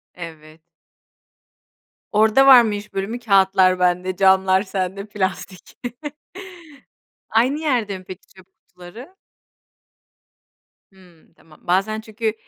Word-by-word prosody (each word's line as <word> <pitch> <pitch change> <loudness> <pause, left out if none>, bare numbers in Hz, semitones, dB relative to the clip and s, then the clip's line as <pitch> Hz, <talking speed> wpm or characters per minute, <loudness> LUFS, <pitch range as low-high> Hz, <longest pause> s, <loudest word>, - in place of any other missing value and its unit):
Evet. 160 -2 -12 1.5
Orada 220 +5 +3
var 260 -3 +9
mı 220 -3 -1
iş 205 +1 -9
bölümü? 200 +5 -4
Kâğıtlar 190 -4 +3
bende, 180 +1 0
camlar 190 0 +3
sende, 195 0 -4
plastik. 190 -2 -6 1.5
Aynı 255 +6 +1
yerde 240 -10 -1
mi 185 - -16
peki 185 0 -11
çöp 190 -1 -20 0.2
kutuları? 180 - -14 1.8
Hımm. 180 -4 -23
Tamam. 160 -2 -22
Bazen 195 +5 0
çünkü, 220 0 -4
190 Hz, 100 wpm, -20 LUFS, 185-220 Hz, 1.8 s, var